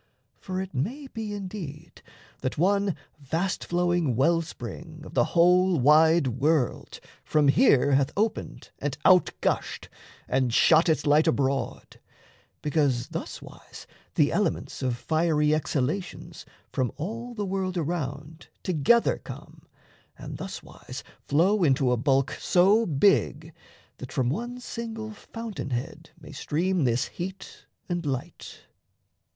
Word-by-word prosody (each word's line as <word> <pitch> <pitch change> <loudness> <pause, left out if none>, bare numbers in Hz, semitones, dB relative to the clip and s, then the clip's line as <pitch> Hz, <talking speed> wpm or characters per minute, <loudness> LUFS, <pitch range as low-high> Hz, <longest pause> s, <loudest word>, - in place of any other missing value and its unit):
For 185 0 -4
it 190 0 -5
may 235 - -3
be, 225 -5 -6
indeed, 180 -6 -7 0.4
That 130 - -3
one 200 +2 +2 0.2
vast 165 +7 -2
flowing 175 -6 +1
well 165 +7 +3
spring 160 +1 -9
of - - -11
the - - +3
whole 180 0 +5
Wide 155 +4 +5
world 150 -3 0 0.2
from 150 -2 +2
here 145 - +4
hath 135 0 +3
opened 220 +2 -2
and 140 -1 -3
out 185 -1 +6
gushed, - - -2 0.4
And 130 -2 +1
shot 160 +8 +5
its 155 -5 +1
light 150 +2 +4
abroad; 140 -3 -1 0.6
because 140 -5 +1
thuswise - - -8 0.3
The - - +3
elements - - -1
of 125 -2 -1
fiery 155 +1 +1
exhalations 155 +4 -3 0.3
From 130 -2 0
all 230 +9 -5
the 210 -2 -2
world 190 -1 -2
around 155 -1 -4 0.2
together 185 +8 +3
come, - - -11 0.5
And - - -7
thuswise - - -8 0.2
flow 180 +7 +3
into 135 -4 +3
a - - +3
bulk 135 +2 +2
so 200 +6 +4
big 160 -1 +2 0.5
That 130 - -8
from 125 -2 0
one 240 - -4
single 225 -2 -6
fountain 220 -5 -7
head 120 -1 -5
may - - -12
stream 175 +1 0
This 120 0 +1
heat 190 +2 -8 0.2
and 175 -1 -2
light. 135 -4 -5
160 Hz, 125 wpm, -26 LUFS, 140-190 Hz, 0.6 s, out